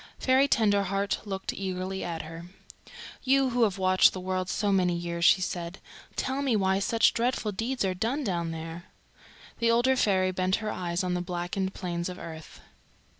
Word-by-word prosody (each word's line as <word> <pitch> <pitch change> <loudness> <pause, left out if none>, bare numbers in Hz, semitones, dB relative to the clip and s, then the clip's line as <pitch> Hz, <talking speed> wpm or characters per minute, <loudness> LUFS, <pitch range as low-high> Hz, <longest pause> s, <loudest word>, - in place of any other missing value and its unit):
Fairy 265 +2 +3
Tenderheart 200 -4 +1
looked 195 -1 -3
eagerly 190 0 -4
at 165 -2 -4
her. 165 +2 -9 0.7
"You 270 0 +3
who 245 0 0
have 200 -3 -2
watched 185 0 +4
the 185 - -5
world 185 0 -2
so 205 -2 0
many 180 -2 +2
years," 170 0 -3
she 185 - +6
said, 175 0 -4 0.4
"tell 265 +1 -1
me 265 -5 +1
why 190 -1 +2
such 225 +3 +3
dreadful 235 -2 0
deeds 225 +3 -2
are 190 - 0
done 230 +10 -1
down 170 -6 -1
there." 165 +1 -6 0.7
The 230 0 +2
older 240 +3 +4
fairy 190 -6 +2
bent 185 +1 +1
her 215 -1 -3
eyes 175 0 -2
on 180 -1 -1
the 180 - -1
blackened 180 +2 -3
plains 175 -1 -3
of 180 - -7
earth. 160 -3 -10
190 Hz, 175 wpm, -28 LUFS, 175-220 Hz, 0.7 s, she